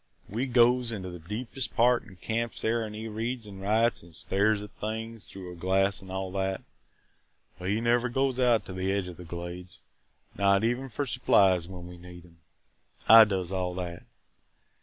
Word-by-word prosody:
"We 120 +7 -2
goes 120 0 +4
into 95 -4 -5
the 90 - -8
deepest 115 - -4
part 120 +1 +4
an' 100 -4 -14
camps 115 +5 -3
there 115 +1 +1
an' 105 -1 -6
he 110 +1 -5
reads 115 +2 -3
an' 100 -2 -10
writes 110 +3 +1
an' 85 -1 -16
stares 100 +5 +1
at 105 - -10
things 110 +1 -5
through 95 -2 -9
a - - -9
glass 95 +3 +2
an' 95 - -13
all 95 0 -4
that, 95 0 -2 1.0
but 90 +1 -4
he 105 +3 0
never 120 +1 +2
goes 130 +1 0
out 120 -3 +3
to 95 - -7
the 95 +1 -1
edge 100 -2 -1
of 90 - -10
the 90 - -10
Glades, 85 +1 -8 0.5
not 100 +1 +3
even 120 +3 0
for 140 +4 -2
supplies 95 -9 +3
when 90 -1 -9
we 90 0 -10
need 90 0 -12
'em. 85 -1 -21 0.7
I 115 0 +10
does 95 -3 -2
all 90 -2 -2
that. 90 -2 -5
100 Hz, 190 wpm, -28 LUFS, 90-115 Hz, 1.0 s, I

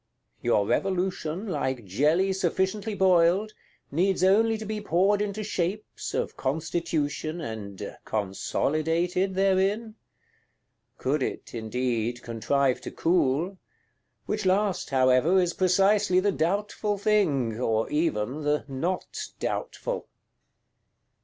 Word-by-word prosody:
Your 105 -4 +2
Revolution, 185 - -1
like 130 - -2
jelly 155 - +2
sufficiently 190 +3 -1
boiled, 190 +2 +3 0.4
needs 185 +5 +1
only 220 +4 +4
to 220 - -7
be 215 0 -3
poured 200 +2 +2
into 210 +1 -2
shapes, 200 0 -3
of - - -2
Constitution, 155 +1 -2
and 105 - -6
"consolidated" 160 - 0
therein? 195 +3 +1 1.0
Could 140 +2 0
it, - - -4
indeed, 120 +1 -2
contrive 130 +3 0
to - - -6
cool; 170 +2 +1 0.7
which 210 0 -2
last, 190 0 +1
however, 130 +6 +4
is 175 -2 +1
precisely 195 +1 +3
the 200 +2 +2
doubtful 205 +4 -1
thing, 155 - +1
or 110 -3 +1
even 150 -3 0
the 150 0 0
not 165 +7 -3
doubtful! - - -3
175 Hz, 105 wpm, -27 LUFS, 135-195 Hz, 1.0 s, only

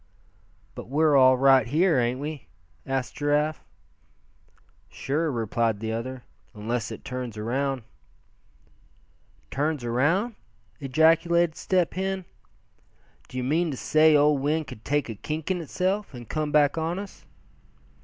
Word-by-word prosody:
"But - - -9
we're 150 +1 +3
all 130 -1 +6
right 135 -2 +5
here, 160 +3 +3
ain't 120 +1 0
we?" 145 - -6 0.4
asked 135 -1 -2
Giraffe. 150 +1 0 1.3
"Sure," 150 +4 -2
replied 115 -2 -1
the 110 +1 -3
other, 125 +2 -5 0.3
"unless 115 +3 -3
it - - -9
turns 125 -3 -5
around." 130 +4 -2 1.7
"Turns 145 -1 -1
around!" 155 - +1 0.5
ejaculated 165 +4 +3
Step 180 -3 0
Hen. 190 0 -3 1.0
"D'ye 125 0 -4
mean 160 +6 +1
to 135 - -4
say 155 +3 +4
that - - +6
old 145 -1 +3
wind 155 +3 0
could 110 -5 -11
take 145 0 0
a 115 - -5
kink 155 - -4
in 180 -2 -1
itself, 185 +2 -2
and 120 -2 -9
come 155 -1 -2
back 150 +1 +3
on 165 +2 -2
us?" 200 0 -9
145 Hz, 135 wpm, -26 LUFS, 125-160 Hz, 1.7 s, all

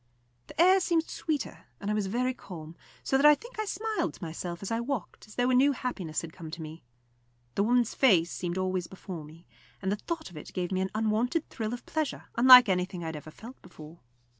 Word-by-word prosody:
The - - -12
air 370 +3 +7
seemed 335 -3 +1
sweeter, 305 -4 -4
and 205 +1 -2
I - - +1
was 210 -2 0
very 250 +5 0
calm, 165 -8 -10 0.3
so 270 - +2
that 275 - +3
I 300 - +8
think 475 +6 -12
I 435 - 0
smiled 435 +1 -2
to - - -12
myself 170 +2 -5
as 195 - -4
I 225 - 0
walked, 235 -5 -4
as 215 - -14
though 245 +1 +2
a - - +3
new 275 +3 +5
happiness 195 - -3
had 165 -1 -8
come 165 -3 -9
to 165 +1 -7
me. 155 +2 -9 0.7
The - - 0
woman's 240 +2 +2
face 180 -10 +4
seemed 175 0 -3
always 185 -2 -1
before 185 -3 -8
me, 160 +3 -14 0.3
and 190 -1 -2
the - - +2
thought 325 - -5
of 165 - -11
it 150 - -10
gave 180 -1 -2
me 185 0 0
an 190 - -1
unwonted 225 +8 0
thrill 220 -1 -3
of 245 - -6
pleasure, 310 -3 -3
unlike 250 0 +10
anything 180 -1 -1
I 165 - -3
had 160 - -6
ever 150 +1 -8
felt 235 +11 -12
before. 155 +2 -13
210 Hz, 230 wpm, -29 LUFS, 175-255 Hz, 0.7 s, unlike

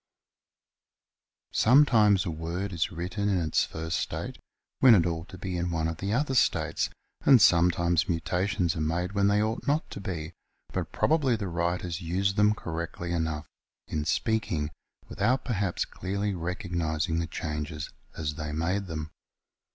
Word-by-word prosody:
Sometimes 110 -7 +5
a 85 - -1
word 85 +5 -4
is 85 -1 0
written 90 +5 -2
in 95 -3 +2
its 80 -3 +1
first 80 +3 -3
state - - -4 0.4
when 125 -4 +8
it 85 -5 +4
ought 80 -1 -3
to 95 - -9
be 95 0 -4
in 90 0 -1
one 80 -1 0
of 80 -1 -3
the 100 +3 -3
other 135 +4 +1
states, 125 - +2 0.3
and 135 -3 +7
sometimes 85 -2 +4
mutations 90 +1 0
are 80 - -2
made 85 +4 -1
when 100 0 +2
they 105 +1 +3
ought 110 +5 -3
not 150 +3 +1
to - - -6
be, 85 -4 -5 0.4
but - - -3
probably 145 -6 +2
the 105 -3 -3
writers 85 0 -2
used 95 +4 0
them 105 0 +4
correctly 85 0 -5
enough 80 -3 -1 0.4
in 75 -1 -2
speaking, 85 -5 0 0.4
without 130 +2 0
perhaps 100 -7 -1
clearly 100 +2 -3
recognising 85 -2 -2
the 85 - -2
changes 75 0 -4 0.3
as 75 -2 -2
they 75 -1 -5
made 90 +6 -1
them. 80 -2 -5
90 Hz, 155 wpm, -28 LUFS, 80-100 Hz, 0.4 s, when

